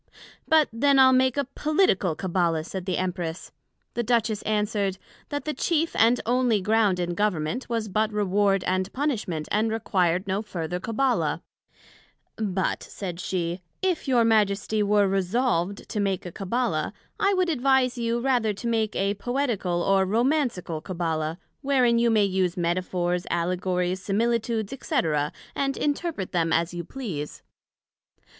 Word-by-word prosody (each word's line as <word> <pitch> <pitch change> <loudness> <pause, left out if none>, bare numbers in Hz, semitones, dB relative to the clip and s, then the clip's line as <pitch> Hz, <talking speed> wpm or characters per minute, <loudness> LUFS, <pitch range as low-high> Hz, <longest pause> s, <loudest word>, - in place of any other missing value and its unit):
But 315 -2 +5
then 280 +4 +3
I'le 260 -1 +7
make 260 +1 +3
a 280 - +1
Political 275 - +1
Cabbala, 170 -3 0
said 190 +1 -6
the 185 - 0
Empress. 180 -2 -3 0.4
The 240 - -1
Duchess 225 -2 +1
answered, 210 -2 0 0.3
That 290 0 -4
the 305 - -1
chief 325 +3 0
and 235 +2 +4
onely 245 -2 +2
ground 205 -2 +2
in 175 0 -1
Government, 205 +4 -1
was 230 -2 -1
but 215 +2 0
Reward 200 -1 +1
and 185 +1 -1
Punishment, 220 - -2
and 215 +2 +2
required 185 -5 +1
no 195 +2 0
further 180 -4 -4
Cabbala; 240 +6 0 0.9
But, 195 -4 -1
said 180 -4 -6
she, 175 -1 -2 0.2
If 365 -5 0
your 245 -3 +4
Majesty 215 -1 +2
were 205 -1 +3
resolved 195 0 0
to 210 - -2
make 195 -3 -1
a 175 - -6
Cabbala, 235 +8 -1 0.3
I 395 0 +3
would 370 -1 +1
advise 265 -3 +2
you, 235 -1 -1
rather 240 -4 +1
to 205 - -9
make 225 -2 0
a 195 +1 +1
Poetical 210 -6 -1
or 195 -1 +3
Romancical 230 - 0
Cabbala, 165 -2 -2 0.2
wherein 255 -4 +3
you 235 0 +3
may 215 -2 +4
use 185 -2 0
Metaphors, 175 0 -1
Allegories, 180 +1 -1
Similitudes, 225 +2 0
&c. 315 - -4 0.6
and 275 -1 -1
interpret 295 - -2
them 165 -2 +1
as 170 +1 +1
you 175 0 -4
please. 175 - -6
210 Hz, 145 wpm, -25 LUFS, 180-245 Hz, 0.9 s, I'le